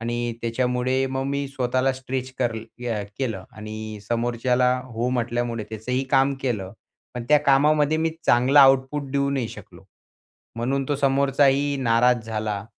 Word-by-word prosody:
आणि 120 Hz, +1 st, -2 dB
त्याच्यामुळे 125 Hz, +2 st, 0 dB
मग 130 Hz, 0 st, -2 dB
मी 140 Hz, 0 st, -2 dB
स्वतःला 130 Hz, 0 st, 0 dB
स्ट्रेच 130 Hz, 0 st, -5 dB
कर 120 Hz, -3 st, +1 dB
अ, 115 Hz, 0 st, -5 dB, 0.2 s
केलं 110 Hz, -9 st, -3 dB
आणि 110 Hz, 0 st, -7 dB
समोरच्याला 120 Hz, +2 st, +1 dB
हो 120 Hz, -1 st, -3 dB
म्हटल्यामुळे 120 Hz, -2 st, -2 dB
त्याचंही 125 Hz, +4 st, -2 dB
काम 135 Hz, 0 st, +3 dB
केलं. 105 Hz, -8 st, -2 dB, 0.4 s
पण 120 Hz, -1 st, -5 dB
त्या 150 Hz, 0 st, +6 dB
कामामध्ये 150 Hz, +2 st, +3 dB
मी 160 Hz, 0 st, +1 dB, 0.2 s
चांगला 130 Hz, +4 st, +5 dB
आउटपुट 135 Hz, +1 st, +4 dB
देऊ 140 Hz, 0 st, 0 dB
नाही 130 Hz, -5 st, -1 dB
शकलो, -, -, -13 dB, 0.7 s
म्हणून 135 Hz, +4 st, -1 dB
तो 145 Hz, -, 0 dB
समोरचाही 140 Hz, +1 st, +2 dB
नाराज 120 Hz, 0 st, +3 dB
झाला 105 Hz, -2 st, -3 dB
125 Hz, 140 wpm, -23 LUFS, 115-135 Hz, 0.7 s, त्या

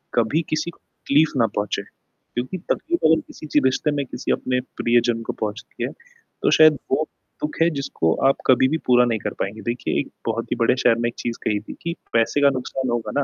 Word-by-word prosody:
कभी 120 Hz, +7 st, +2 dB
किसी 155 Hz, +2 st, -1 dB
को -, -, -25 dB, 0.3 s
तकलीफ 150 Hz, +2 st, +4 dB
ना 115 Hz, -3 st, +4 dB
पहुँचे, 105 Hz, 0 st, -1 dB
क्योंकि 130 Hz, +10 st, -8 dB
तकलीफ 345 Hz, +1 st, 0 dB
अगर 160 Hz, +1 st, +5 dB
किसी -, -, -11 dB
ची 150 Hz, -, +3 dB
रिश्ते 130 Hz, +3 st, +2 dB
में 145 Hz, -1 st, -1 dB
किसी -, -, -4 dB
अपने 125 Hz, 0 st, 0 dB, 0.2 s
प्रियजन 120 Hz, -1 st, +2 dB
को -, -, -3 dB
पहुँचती 105 Hz, 0 st, -4 dB
है, -, -, -1 dB
तो 470 Hz, -1 st, -5 dB
शायद 155 Hz, -2 st, +7 dB
वो 145 Hz, +4 st, +2 dB, 0.4 s
दुख 150 Hz, -, -2 dB
है 165 Hz, -, +5 dB
जिसको 135 Hz, -12 st, 0 dB
आप 135 Hz, -, +4 dB
कभी 130 Hz, 0 st, +5 dB
भी 160 Hz, -, +1 dB
पूरा 125 Hz, -1 st, +6 dB
नहीं 115 Hz, -2 st, 0 dB
कर -, -, -4 dB
पाएँगे, 105 Hz, +3 st, -3 dB
देखिए 120 Hz, +3 st, -1 dB
एक -, -, -3 dB, 0.2 s
बहुत 115 Hz, 0 st, -2 dB
ही -, -, +2 dB
बड़े 115 Hz, +1 st, +3 dB
शायर 125 Hz, -3 st, +3 dB
ने 120 Hz, 0 st, 0 dB
एक 120 Hz, -, -11 dB
चीज़ 120 Hz, -1 st, -3 dB
कही 105 Hz, -1 st, +1 dB
थी -, -, -9 dB
कि 170 Hz, -, -2 dB, 0.2 s
पैसे 115 Hz, +5 st, +2 dB
का 140 Hz, -, +7 dB
नुकसान 130 Hz, 0 st, -3 dB
होगा 120 Hz, -1 st, -2 dB
ना, -, -, +2 dB
125 Hz, 220 wpm, -22 LUFS, 115-150 Hz, 0.4 s, शायद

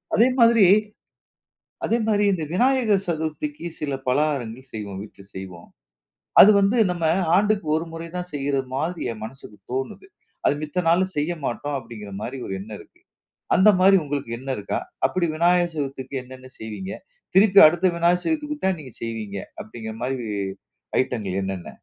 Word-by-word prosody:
அதே 230 Hz, +4 st, +5 dB
மாதிரி 230 Hz, -3 st, +6 dB, 1.2 s
அதே 230 Hz, -, +2 dB
மாரி 210 Hz, -1 st, +2 dB
இந்த 170 Hz, -4 st, -2 dB
விநாயகர் 230 Hz, -2 st, +2 dB
சதுர்த்திக்கு 170 Hz, -, -3 dB
சில 145 Hz, -2 st, -2 dB
பலகாரங்கள் 130 Hz, -3 st, -1 dB
செய்வோம் 100 Hz, -3 st, -6 dB
வீட்ல 105 Hz, -1 st, -12 dB
செய்வோம். 95 Hz, -2 st, -9 dB, 0.7 s
அது 210 Hz, -, +10 dB
வந்து 200 Hz, +5 st, +2 dB
நம்ம 175 Hz, -2 st, -2 dB, 0.3 s
ஆண்டுக்கு 205 Hz, -2 st, +1 dB
1 165 Hz, -, -2 dB
முறை 165 Hz, 0 st, -6 dB
தான் 180 Hz, 0 st, -5 dB
செய்ற 140 Hz, 0 st, -1 dB, 0.2 s
மாதிரி 160 Hz, +5 st, -2 dB
என் 110 Hz, -, -10 dB
மனசுக்கு 110 Hz, -3 st, -11 dB
தோணுது. 135 Hz, -, -4 dB, 0.4 s
அது -, -, +4 dB
மித்த 180 Hz, +4 st, -2 dB
நாள்ல 175 Hz, +3 st, +4 dB
செய்ய 150 Hz, +4 st, 0 dB
மாட்டோம் 145 Hz, +4 st, -2 dB
அப்படிங்கிற 115 Hz, -4 st, -9 dB
மாரி 130 Hz, +5 st, -5 dB
ஒரு 95 Hz, -, -4 dB
எண்ணம் 105 Hz, +2 st, -8 dB
இருக்கு. -, -, -19 dB, 0.6 s
அந்த 190 Hz, +3 st, +6 dB
மாரி 195 Hz, +1 st, +7 dB
உங்களுக்கு 140 Hz, -4 st, -4 dB
எண்ணம் 130 Hz, 0 st, -3 dB
இருக்கா? 100 Hz, -1 st, -3 dB, 0.3 s
அப்படி 185 Hz, -2 st, 0 dB
விநாயகர் 175 Hz, +1 st, +3 dB
சதுர்த்திக்கு 135 Hz, -2 st, -4 dB
என்னென்ன 130 Hz, 0 st, -12 dB
செய்வீங்க? 110 Hz, -, -6 dB, 0.4 s
திருப்பி 195 Hz, 0 st, +7 dB
அடுத்த 175 Hz, +4 st, 0 dB
விநாயகர் 175 Hz, +1 st, +2 dB
சதுர்த்திக்கு 300 Hz, -2 st, -1 dB
தான் 190 Hz, -3 st, +1 dB
நீங்க 130 Hz, -4 st, -12 dB
செய்வீங்க. 110 Hz, -3 st, -5 dB, 0.3 s
அப்டிங்கிற 110 Hz, 0 st, -8 dB
மாதிரி 125 Hz, -3 st, -3 dB, 0.7 s
ஐட்டங்கள் 105 Hz, -7 st, -3 dB
என்னென்ன? 95 Hz, -2 st, -5 dB
145 Hz, 150 wpm, -23 LUFS, 115-185 Hz, 1.2 s, அது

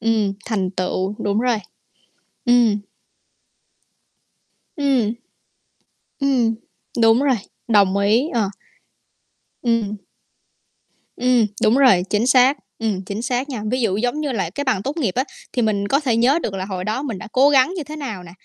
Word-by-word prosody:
Ừm, 220 Hz, -3 st, +1 dB
thành 195 Hz, -5 st, -1 dB
tựu, 185 Hz, +1 st, -2 dB
đúng 205 Hz, +2 st, 0 dB
rồi. 245 Hz, -2 st, +1 dB, 0.9 s
Ừm. 240 Hz, -4 st, +4 dB, 2.0 s
Ừm. 265 Hz, -7 st, +1 dB, 1.1 s
Ừm, 255 Hz, -5 st, +2 dB, 0.5 s
đúng 225 Hz, +1 st, +5 dB
rồi, 270 Hz, -3 st, +3 dB, 0.3 s
đồng 200 Hz, -3 st, +4 dB
ý, 220 Hz, +10 st, +2 dB
ờ. 220 Hz, -5 st, +1 dB, 1.1 s
Ừm. 230 Hz, -3 st, 0 dB, 1.2 s
Ừm, 250 Hz, -3 st, +3 dB, 0.2 s
đúng 220 Hz, +4 st, +4 dB
rồi, 250 Hz, -10 st, +5 dB
chính 215 Hz, +3 st, +1 dB
xác, 260 Hz, +2 st, +5 dB, 0.2 s
ừm, 210 Hz, -4 st, -1 dB
chính 200 Hz, +4 st, -4 dB
xác 250 Hz, +3 st, -2 dB
nha. 245 Hz, -6 st, -4 dB
Ví 255 Hz, 0 st, 0 dB
dụ 200 Hz, -4 st, +1 dB
giống 245 Hz, +6 st, -1 dB
như 290 Hz, -3 st, -2 dB
là 195 Hz, -8 st, -2 dB
cái 285 Hz, +11 st, -4 dB
bằng 250 Hz, -8 st, 0 dB
tốt 285 Hz, +4 st, -4 dB
nghiệp 240 Hz, -, -1 dB
á, 260 Hz, -, +2 dB, 0.3 s
thì 250 Hz, -, 0 dB
mình 200 Hz, -3 st, 0 dB
có 275 Hz, -, +2 dB
thể 255 Hz, -7 st, 0 dB
nhớ 260 Hz, +7 st, +3 dB
được 200 Hz, -, -3 dB
là 190 Hz, -1 st, -3 dB
hồi 185 Hz, -2 st, -4 dB
đó 215 Hz, +7 st, -2 dB
mình 240 Hz, -8 st, -4 dB
đã -, -, -9 dB
cố 270 Hz, +3 st, +5 dB
gắng 275 Hz, +4 st, +4 dB
như 330 Hz, -, -3 dB
thế 300 Hz, +2 st, -8 dB
nào 225 Hz, -11 st, -6 dB
nè, 170 Hz, -, -12 dB
230 Hz, 165 wpm, -20 LUFS, 205-260 Hz, 2.0 s, đúng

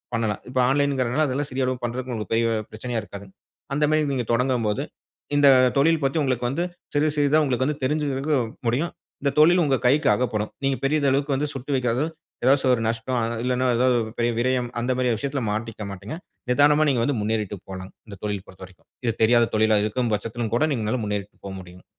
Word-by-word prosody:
பண்ணலாம். 110 Hz, -2 st, -1 dB
இப்ப 130 Hz, 0 st, -1 dB
ஆன்லைன்கிறதுனால 140 Hz, 0 st, +1 dB
அதுலாம் 140 Hz, +2 st, -2 dB
சிறிய 130 Hz, 0 st, 0 dB
அளவுக்கு 125 Hz, -1 st, -2 dB
பண்றதுக்கு 125 Hz, +1 st, -4 dB
உங்களுக்கு 110 Hz, 0 st, -4 dB
பெரிய 115 Hz, 0 st, +2 dB, 0.2 s
பிரச்சனையா 115 Hz, +1 st, -3 dB
இருக்காதுங்க. 100 Hz, -1 st, -11 dB, 0.4 s
அந்த 150 Hz, -, +1 dB
மாதிரி 155 Hz, -1 st, +2 dB
நீங்க 125 Hz, -3 st, -1 dB
தொடங்கும் 125 Hz, -1 st, +1 dB
போது, 105 Hz, -, -1 dB, 0.5 s
இந்த 145 Hz, 0 st, +5 dB, 0.3 s
தொழில் 160 Hz, +3 st, +3 dB
பற்றி 135 Hz, +3 st, +1 dB
உங்களுக்கு 125 Hz, -3 st, 0 dB
வந்து 145 Hz, +7 st, -1 dB, 0.3 s
சிறிது 150 Hz, +1 st, +2 dB
சிறிதா 145 Hz, +2 st, +4 dB
உங்களுக்கு 130 Hz, -2 st, 0 dB
வந்து 150 Hz, 0 st, -2 dB
தெரிஞ்சிக்கிறதுக்கு 145 Hz, +1 st, 0 dB, 0.3 s
முடியும். 135 Hz, +9 st, 0 dB, 0.3 s
இந்த 140 Hz, -1 st, +1 dB
தொழில் 175 Hz, +4 st, +6 dB
உங்க 135 Hz, -2 st, +2 dB
கைக்கு 145 Hz, +4 st, +3 dB
அகப்படும். 110 Hz, -3 st, -1 dB, 0.2 s
நீங்க 135 Hz, -1 st, +1 dB
பெரிதளவுக்கு 140 Hz, -1 st, +1 dB
வந்து 145 Hz, +2 st, -1 dB
சுட்டு 135 Hz, +2 st, -4 dB
வைக்காத 125 Hz, -1 st, 0 dB, 0.4 s
ஏதாச்சு 135 Hz, +2 st, +4 dB
ஒரு 115 Hz, -, 0 dB
நஷ்டம், 115 Hz, +3 st, -2 dB
அ -, -, 0 dB, 0.2 s
இல்லைனா 125 Hz, 0 st, 0 dB
ஏதாவது 125 Hz, +1 st, +3 dB
ஒரு 110 Hz, -, -7 dB
பெரிய 120 Hz, 0 st, +2 dB
விரயம் 125 Hz, 0 st, 0 dB
அந்த 125 Hz, -, 0 dB
மாதிரியான 125 Hz, -3 st, +1 dB
விஷயத்தில 140 Hz, +1 st, -2 dB
மாட்டிக்க 110 Hz, 0 st, -4 dB
மாட்டீங்க. 100 Hz, -, -7 dB, 0.3 s
நிதானமா 145 Hz, +3 st, +5 dB
நீங்க 125 Hz, -4 st, +1 dB
வந்து 140 Hz, 0 st, 0 dB
முன்னேறிட்டு 105 Hz, -1 st, -1 dB
போலாம், 95 Hz, 0 st, -7 dB, 0.2 s
இந்த 100 Hz, -2 st, -9 dB
தொழில் 105 Hz, -2 st, -3 dB
பொறுத்த 95 Hz, 0 st, -13 dB
வரைக்கும். 90 Hz, -1 st, -21 dB, 0.2 s
இது 115 Hz, -, +1 dB
தெரியாத 120 Hz, +1 st, +4 dB
தொழிலா 110 Hz, 0 st, +4 dB
இருக்கும் 115 Hz, +2 st, -1 dB
பட்சத்திலும் 115 Hz, +1 st, -4 dB
கூட, 150 Hz, -, +3 dB
நீங்க 115 Hz, -5 st, -2 dB
நல்லா 125 Hz, +1 st, -1 dB
முன்னேறிட்டு 105 Hz, 0 st, -4 dB
போக 100 Hz, -, -5 dB
முடியும். 90 Hz, 0 st, -14 dB
125 Hz, 195 wpm, -24 LUFS, 110-140 Hz, 0.5 s, தொழில்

